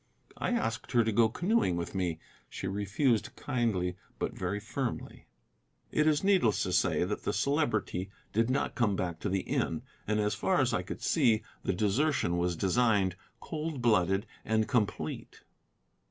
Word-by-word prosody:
I - - 0
asked 135 - -2
her 120 -1 +5
to 110 - 0
go 110 +1 +4
canoeing 175 - +1
with 85 - -4
me. 90 -4 -1 0.3
She - - -6
refused 105 +5 0
kindly 95 -8 -1 0.2
but - - -2
very 95 +2 -2
firmly. 120 +3 -4 0.6
It 155 0 +2
is 150 +1 +3
needless 185 - +3
to - - -2
say - - +2
that 100 +4 -2
the - - -1
Celebrity 110 - 0 0.2
did 115 +3 +2
not 130 - 0
come 110 -5 +1
back 85 -3 -3
to 105 - -2
the 95 0 0
inn, 80 -2 -1 0.2
and 105 0 +1
as 105 0 +1
far - - +1
as - - +2
I - - +1
could - - -7
see 110 -2 +3 0.2
the - - 0
desertion 105 - +1
was 90 0 0
designed, 100 0 +2 0.2
cold 155 -2 -4
blooded, 95 -2 +3 0.2
and 110 0 +1
complete. 110 -5 -2
110 Hz, 165 wpm, -30 LUFS, 95-125 Hz, 0.6 s, her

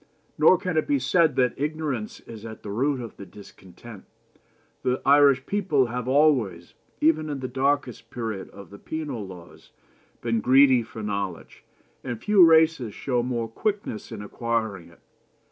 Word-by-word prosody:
"Nor 160 +4 +5
can 180 -3 -3
it 155 - +1
be 290 - +2
said 165 - +2
that 125 -2 +2
ignorance 145 -7 -3
is 110 -2 -11
at 110 -1 -9
the 100 - -6
root 135 +6 0
of 115 - -9
the 100 - -9
discontent. 100 +2 -14 0.8
The 125 +1 0
Irish 140 -1 +5
people 180 -10 +1
have 125 +1 -5
always, 130 - +2 0.3
even 155 0 +2
in 145 -2 -4
the 130 - -4
darkest 130 -2 -1
period 110 -5 -5
of 100 0 -13
the 100 - -12
penal 145 -10 -5
laws, 90 -2 -13 0.5
been 115 -1 -1
greedy 130 0 +5
for 110 -1 -9
knowledge, 100 -4 -5 0.4
and 120 -3 -5
few 205 - +5
races 160 -8 +4
show 125 -3 -1
more 120 -2 -2
quickness 200 - -4
in - - -7
acquiring 110 -5 -3
it. 85 - -22
125 Hz, 160 wpm, -25 LUFS, 110-150 Hz, 0.8 s, Nor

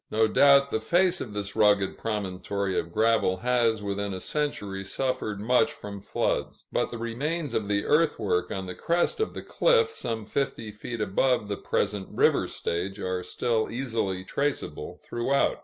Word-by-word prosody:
No 110 +1 +3
doubt 140 +3 +5
the 110 - +1
face 175 +10 +2
of 110 - -6
this 100 -1 -4
rugged 105 -3 +3
promontory 100 -2 -2
of 85 - -5
gravel 110 -3 +2
has, 115 -4 +2
within 100 -1 -2
a - - -5
century, 100 -7 -2
suffered 120 -1 -2
much 125 +7 +3
from 100 -9 -8
floods; - - -2
but - - 0
the 120 - -6
remains 140 +7 -3
of 105 - -1
the 100 0 0
earthwork 115 - +2
on 95 -1 -3
the 90 - -5
crest 170 - 0
of 440 - -1
the - - -5
cliff, 470 -2 +3
some 115 - -4
fifty 115 -3 -2
feet 110 +2 -6
above 105 +2 +1
the 100 - -1
present 100 -2 -1
river - - +3
stage, 95 +4 -3
are 90 -1 -2
still 115 +3 0
easily 115 -7 -2
traceable 140 +9 -3
throughout. 135 +4 +1
110 Hz, 165 wpm, -27 LUFS, 100-135 Hz, -, doubt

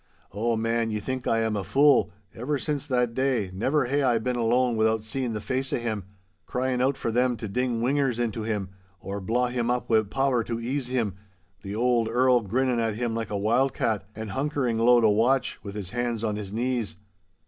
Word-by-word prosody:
Oh, 115 +4 0
man, 115 0 0
ye 105 -1 -2
think 130 +4 -4
I 115 0 +2
am 110 -1 0
a 100 - -2
fool. 140 - +4 0.2
Ever 140 +6 -2
since 145 0 -3
that 125 -2 +1
day, 130 -7 0
never 130 +9 +1
hae 140 +4 +1
I 125 -4 +3
been 125 +3 -1
alone 120 +1 +2
without 110 0 +2
seeing 120 +2 -3
the 105 - -2
face 130 +4 -2
o' - - +1
him, 110 -5 -3 0.4
crying 125 0 -1
out 135 +1 +2
for 115 - -2
them 125 +1 +2
to 110 - -5
ding 120 +2 -1
whingers 135 -1 +1
into 115 -2 -1
him, 105 -3 -2 0.3
or 100 +3 -5
blaw 120 +6 +1
him 120 -1 -1
up 125 -1 -1
wi' 110 -1 +5
powder 125 +3 0
to 115 -1 -3
ease 125 +3 -2
him—the 100 -5 -5
auld 120 0 +2
Earl 125 +1 +4
girnin' 125 +4 0
at 115 -2 0
him 120 0 -2
like 115 0 -3
a 105 - -2
wild 120 +6 +2
cat, 110 -4 0
and 110 -1 -6
hunkering 135 -3 -1
low 120 +1 +6
to 110 - +5
watch, 125 +5 +2
with 100 -2 -7
his 100 -3 -5
hands 120 -2 -2
on 105 -2 0
his 105 -2 -6
knees. 115 -6 -2
115 Hz, 210 wpm, -26 LUFS, 110-125 Hz, 0.4 s, low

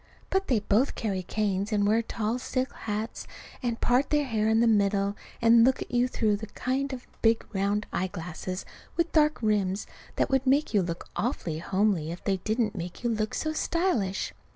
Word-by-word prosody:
But 385 +1 +1
they 235 -5 +2
both 215 +7 +2
carry 200 -5 -2
canes 200 +1 -1
and 205 -1 +2
wear 220 +3 +3
tall 225 +1 -2
silk 255 0 -2
hats, 215 +1 -4 0.3
and 235 -3 -2
part 250 +3 +2
their 295 -1 +2
hair 220 -4 +1
in 220 0 +4
the 235 - +4
middle, 200 -2 +2 0.3
and 230 0 +7
look 260 +2 +4
at - - -17
you 245 0 +3
through 215 -4 +1
the 220 +1 -7
kind 265 +6 -2
of 255 -2 -6 0.2
big 225 0 +3
round 200 +1 0
eyeglasses 180 0 -4 0.3
with 335 0 +1
dark 305 -1 +4
rims 205 -2 +1 0.3
that - - 0
would 265 0 +2
make 280 +1 +3
you 205 - +4
look 170 -1 -4
awfully 175 - -2
homely 190 -3 +1
if 175 - -8
they 195 -1 +1
didn't 220 +3 0
make 180 +4 -6
you 240 - +1
look 215 -1 -1
so 310 0 -1
stylish. 310 - 0
215 Hz, 190 wpm, -28 LUFS, 200-250 Hz, 0.3 s, and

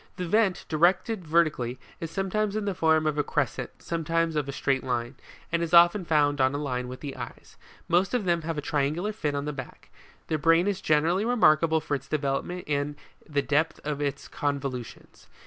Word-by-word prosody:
The 180 - -3
vent, 210 0 +2
directed 180 +4 +1
vertically, 150 -7 +1 0.2
is 165 - -4
sometimes 200 +3 -1
in 215 -1 -1
the 200 - 0
form 160 -2 +2
of 150 -1 0
a - - +3
crescent, 135 -4 -3
sometimes 165 0 -1
of 145 -2 -1
a - - -1
straight 135 -1 0
line, 120 -1 -2 0.4
and 170 0 +1
is 170 0 +1
often 175 +3 +6
found 145 -3 +2
on 130 +2 +3
a - - 0
line 125 -4 -3
with 125 +1 -8
the 140 -3 -6
eyes. - - -9 0.3
Most 185 +7 +2
of 230 -5 0
them 170 -2 +2
have 160 0 -4
a - - -1
triangular 150 +8 -1
fin 150 -9 -2
on 140 0 -2
the 150 - -3
back. 130 -3 -9 0.4
Their 155 - -1
brain 165 +3 +4
is 200 -2 -1
generally 160 +6 +2
remarkable 165 -9 +3
for 150 - -4
its 135 -1 -3
developement 150 +5 -2
and 145 0 -1 0.3
the 145 -2 0
depth 155 +3 +1
of 145 -1 -3
its 140 -1 -3
convolutions. 135 -5 -5
155 Hz, 200 wpm, -27 LUFS, 140-175 Hz, 0.4 s, often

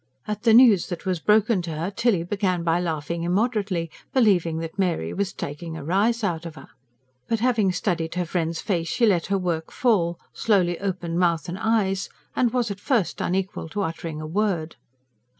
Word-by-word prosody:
At 210 0 -3
the 225 -1 +4
news 230 -7 +6
that 175 +1 -6
was 185 -3 0
broken 215 +1 +3
to 165 -2 -5
her 165 +5 -3
Tilly 220 -5 +1
began 185 -1 -1
by 170 +1 +2
laughing 165 -1 -3
immoderately, 190 -2 0 0.2
believing 185 -10 +3
that 165 +4 -6
Mary 170 - 0
was 200 -1 -1
"taking 160 +3 -6
a 150 - -7
rise 210 +8 +1
out 170 -5 -1
of 160 - -10
her." - - -13 0.6
But 230 - 0
having 225 -6 +2
studied 175 -3 -2
her 180 -1 0
friend's 165 -1 -2
face 170 -4 -1
she 235 +8 +2
let 185 -6 +2
her 200 +1 +1
work 170 -4 -2
fall, 175 -9 +1 0.2
slowly 180 -6 +1
opened 175 -3 -2
mouth 170 -4 +1
and 180 +2 -5
eyes, 210 -4 +1 0.3
and 245 -2 +2
was 240 -3 0
at 200 - -6
first 235 - 0
unequal 185 -2 -2
to 205 +4 -2
uttering 165 -2 -4
a 155 - -5
word. 170 -2 -1
180 Hz, 185 wpm, -24 LUFS, 165-210 Hz, 0.6 s, news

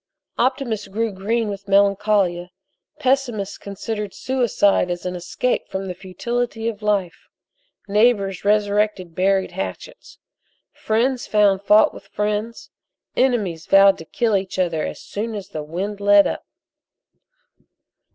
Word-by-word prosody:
Optimists 240 -5 0
grew 220 +3 -2
green 215 +4 -1
with 200 -1 -6
melancholia, 200 -3 +2 0.5
pessimists 255 -8 0
considered 210 0 -5
suicide 235 -8 +1
as 175 0 -4
an 180 0 -3
escape 180 +8 -2
from 190 0 -4
the 185 - -4
futility 225 +5 -3
of 220 -2 -4
life, 205 -4 -1 0.6
neighbors 205 -3 +2
resurrected 205 -3 +1
buried 190 +1 +1
hatchets. 345 - -7 0.6
Friends 240 +4 0
found 205 -2 +3
fault 210 +1 +5
with - - -13
friends. 210 +2 -3 0.4
Enemies 205 -11 0
vowed 195 0 +6
to 160 - -9
kill 225 +4 0
each 190 -1 -2
other 170 -4 0
as - - -7
soon 220 +2 -5
as 200 -2 -7
the 155 - -5
wind 185 +7 -4
let 205 0 +6
up. - - -4
205 Hz, 125 wpm, -21 LUFS, 190-225 Hz, 0.6 s, vowed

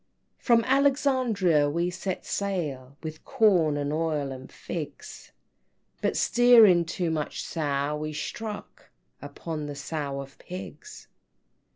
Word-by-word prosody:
V. - - -28
"From 235 -2 +5
Alexandria 255 - +2
we 170 +4 0
set 185 +1 -4
sail, 145 -10 -3
With 155 0 -7
corn, 175 -9 +3
and 145 0 -2
oil, 155 -3 -1
and 130 0 -9
figs, 175 - -7 0.7
But - - 0
steering 225 -8 +6
'too 170 0 -2
much 155 -2 -3
Sow,' 145 -2 -1
we 155 0 -4
struck 210 +7 -6 0.3
Upon 155 -3 -6
the 145 - -6
Sow 140 -1 -4
and 135 0 -12
Pigs!" 190 - -9
165 Hz, 125 wpm, -27 LUFS, 145-210 Hz, 0.7 s, steering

